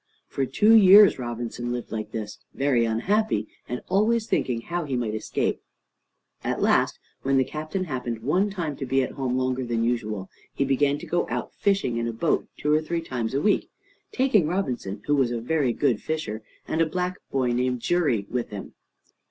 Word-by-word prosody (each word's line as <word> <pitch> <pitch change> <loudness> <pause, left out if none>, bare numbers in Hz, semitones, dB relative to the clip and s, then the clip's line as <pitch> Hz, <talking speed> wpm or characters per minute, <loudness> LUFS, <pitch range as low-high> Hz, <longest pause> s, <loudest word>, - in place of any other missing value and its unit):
For 135 -1 -2
two 215 - +4
years 205 -4 +8
Robinson 120 0 -4
lived 120 -1 -4
like 110 -1 -4
this, 110 -2 -5 0.2
very 135 -4 +2
unhappy, 115 - 0 0.2
and 125 - -3
always 215 +4 +2
thinking 120 - 0
how 175 +6 -3
he 140 -4 -3
might 120 -3 -1
escape. 110 - -1 0.8
At - - -1
last, - - +2 0.2
when 135 0 +2
the 130 - +4
Captain 155 +7 -4
happened 125 -8 -4
one 180 - +2
time 170 -7 -3
to 135 - -5
be 135 +1 +2
at - - -4
home 130 -2 -2
longer 130 0 0
than 120 -2 -1
usual, 110 -5 -1 0.3
he 140 - +1
began 140 +1 +2
to - - -9
go 175 - 0
out - - -3
fishing 195 - 0
in 115 0 -1
a 115 - -3
boat 150 +8 0
two 150 +1 +1
or 155 - +3
three 165 +2 -2
times 125 -6 -3
a 140 - +1
week, 210 - +2 0.4
taking 240 - +3
Robinson, 125 - -3
who 145 - +1
was 135 -4 +2
a 120 -1 -2
very 135 +1 +1
good 125 -3 +1
fisher, 135 -9 -3 0.3
and 160 - 0
a 165 - +3
black 180 +2 -2
boy 130 -2 +1
named 125 0 0
Xury, 150 - +1
with 125 -1 -3
him. 105 -2 -8
130 Hz, 195 wpm, -25 LUFS, 120-170 Hz, 0.8 s, years